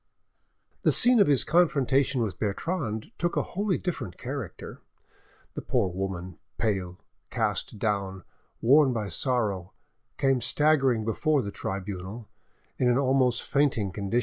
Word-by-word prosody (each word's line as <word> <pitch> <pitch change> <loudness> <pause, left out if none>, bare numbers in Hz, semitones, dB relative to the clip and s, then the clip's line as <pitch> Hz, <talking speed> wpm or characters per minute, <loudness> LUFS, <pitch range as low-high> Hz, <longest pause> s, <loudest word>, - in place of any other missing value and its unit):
The - - +3
scene 245 -1 +5
of 200 - +5
his 140 -3 +5
confrontation 140 -6 +2
with 105 -4 -4
Bertrande 110 - -3
took 175 0 -1
a - - +2
wholly 200 0 0
different 170 - -5
character. 130 -6 -7 0.7
The - - -5
poor 95 - 0
woman, 90 -1 -5 0.2
pale, 95 -5 -2 0.3
cast - - -2
down, 100 -3 -2 0.4
worn 135 +2 +5
by 105 -4 -3
sorrow, 100 -3 -2 0.4
came 135 -2 +2
staggering 135 -5 +2
before 145 +6 +1
the 100 - -5
tribunal, 100 +3 -6 0.5
in 125 - +3
an 120 - +3
almost 130 -3 +2
fainting 135 -9 +1
condition. 100 +5 -1
120 Hz, 130 wpm, -27 LUFS, 100-140 Hz, 0.7 s, scene